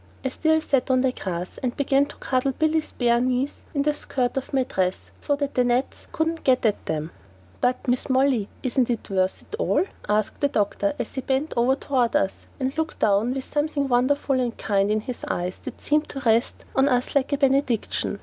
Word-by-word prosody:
I - - +2
still 315 +4 +2
sat 270 -4 +1
on 255 -1 +4
the 260 -1 +2
grass, 180 -6 -5
and 250 -2 -1
I - - -25
began 280 0 +2
to 290 - -11
cuddle 260 +1 0
Billy's 315 +2 0
bare 235 -1 +2
knees 255 +2 -1
in 280 - +2
the 300 +1 +2
skirt 255 -4 -2
of 270 - -3
my 270 -2 +2
dress 185 -6 -2
so 290 - +1
the 285 0 -1 0.2
gnats 245 +2 -1
couldn't 325 0 -1
get 255 -2 +3
at 210 -2 0
them. 155 +1 -2 0.5
"But, 250 0 +1
Mrs. 250 +1 0
Molly, 260 -5 +2
isn't 255 -1 +1
it 235 -4 -3
worth 185 -1 0
it - - -7
all?" - - +2 0.3
asked 210 0 0
the 285 - +4
doctor 275 +5 0
as - - -4
he 265 - -3
bent 270 +4 -1
over 245 +3 +3
toward 255 -4 0
us 190 - 0
and 265 0 -1
looked 320 0 -2
down 215 +5 +2
with 270 - -3
something 295 -1 -1
wonderful 265 +2 +2
and 240 -2 -2
kind 200 -1 +1
in 215 0 +1
his 245 +2 -6
eyes 180 +1 -2
that - - -7
seemed 300 +1 +1
to 275 - -5
rest 230 0 +1
on 270 +1 +4
us 250 -1 0
like 280 0 +1
a - - +2
benediction. 265 -7 +1
260 Hz, 210 wpm, -24 LUFS, 235-280 Hz, 0.5 s, on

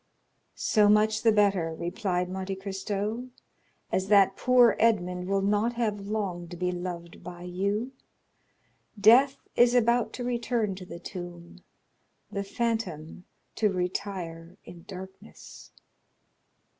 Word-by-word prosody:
"So 210 -1 +3
much 215 +1 +3
the 225 - +5
better," 195 -6 +2
replied 180 0 -2
Monte 190 +1 -4
Cristo; 200 +4 -4 0.6
"as 190 +1 0
that 195 -1 +5
poor 250 -2 +5
Edmond 180 -5 +1
will 195 0 +1
not 210 +4 +1
have 210 -4 -2
long 195 -5 -3
to 175 +1 -9
be 180 +1 -1
loved 175 -1 -6
by 175 -1 -9
you. 200 +7 -2 1.1
Death 250 +7 +6 0.2
is 240 0 +5
about 235 0 +3
to 250 - -5
return 235 -3 -1
to 185 -1 -10
the 170 - -8
tomb, 175 -1 -9 0.7
the 200 - -2
phantom 195 -7 -3 0.3
to 210 -2 +1
retire 180 -2 -4
in 170 -1 -12
darkness." 190 0 -11
195 Hz, 120 wpm, -28 LUFS, 180-220 Hz, 1.1 s, Death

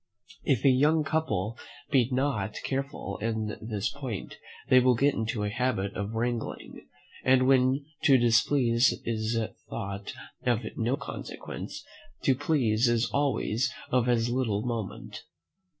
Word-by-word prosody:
If 130 -3 +1
a - - +8
young 150 +5 +4
couple 140 -9 -1 0.3
be 130 -4 +4
not 125 -6 0
careful 135 +1 -3
in 110 -1 -2
this 110 +1 -2
point 130 -8 -6 0.3
they 130 - +7
will 125 0 +4
get 140 +4 +3
into 110 -1 -2
a 105 - -1
habit 120 -5 -1
of 105 +2 -4
wrangling; 120 0 -3 0.4
and 130 0 +4
when 130 +1 +3 0.2
to 135 -2 +7
displease 120 +1 +3
is 110 0 -1 0.3
thought 100 +1 -5 0.3
of 120 -2 +2
no 120 +4 0
consequence, 140 - -7 0.4
to 135 - +4
please 125 -5 +2
is 120 0 +1
always 135 -2 +1 0.2
of 125 -1 +2
as 115 -1 +2
little 115 -5 0
moment. 115 -6 -5
120 Hz, 135 wpm, -28 LUFS, 110-135 Hz, 0.4 s, a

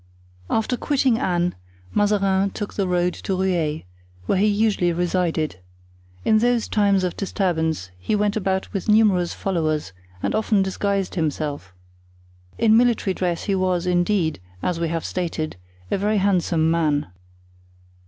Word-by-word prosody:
After 225 +3 0
quitting 265 -5 +1
Anne, 175 -7 0 0.4
Mazarin 200 -2 +2
took 205 +1 -6
the 195 -2 -1
road 180 0 +1
to 190 - -3
Rueil, 175 -5 0 0.4
where 185 - +1
he 210 - +4
usually 205 -4 +2
resided; 170 - -1 0.7
in 215 - +4
those 240 0 +1
times 200 -3 +2
of 180 - -1
disturbance 160 - -1
he 90 - -1
went 210 0 +1
about 190 -2 -1
with 195 +1 -3
numerous 205 -5 +3
followers 155 - -1 0.3
and - - 0
often 215 -2 +2
disguised 195 0 -1
himself. 150 - -2 0.9
In 220 -1 +4
military 235 -5 +3
dress 175 -2 -2
he 200 - 0
was, 185 -2 0
indeed, 175 -2 +1 0.2
as 175 -2 -1
we 170 - 0
have 165 0 -3
stated, 165 -3 -3 0.4
a - - +1
very 210 +2 +1
handsome 175 -5 +2
man. 155 -3 +1
185 Hz, 140 wpm, -22 LUFS, 170-205 Hz, 0.9 s, he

